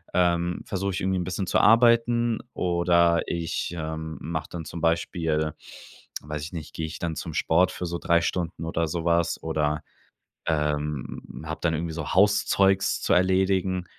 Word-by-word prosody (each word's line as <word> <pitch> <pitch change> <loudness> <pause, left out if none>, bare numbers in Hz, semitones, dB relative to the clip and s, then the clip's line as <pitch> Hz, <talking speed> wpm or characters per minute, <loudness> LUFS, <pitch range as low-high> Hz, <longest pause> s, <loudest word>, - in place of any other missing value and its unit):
ähm, 85 -1 +1
versuch 100 0 -2
ich 95 - -3
irgendwie 95 0 0
'n - - -1
bisschen 90 +2 -3
zu - - +2
arbeiten, 115 +1 +4
oder 85 -1 +3
ich, 85 -1 -2
ähm, 80 0 -5
mach 80 -2 -4
dann 85 -2 -7
zum 85 +1 -7
Beispiel 80 -2 0 0.7
weiß 75 +1 -5
ich 80 +4 -7
nicht 80 -4 -7
geh 80 - -3
ich 80 - -6
dann 85 -2 -3
zum 80 - -5
Sport 90 +3 +3
für 90 - -5
so 85 0 -3
3 85 0 +3
Stunden 85 -1 -2
oder 85 0 -1
sowas, 85 +1 0
oder, 75 -2 -1 0.6
ähm, 75 -2 -2
hab 80 0 -5
dann 85 -2 +1
irgendwie 80 +1 -3
so 80 -3 -4
Hauszeugs 95 0 +3
zu - - +1
erledigen. 95 0 +2
85 Hz, 165 wpm, -26 LUFS, 80-95 Hz, 0.7 s, arbeiten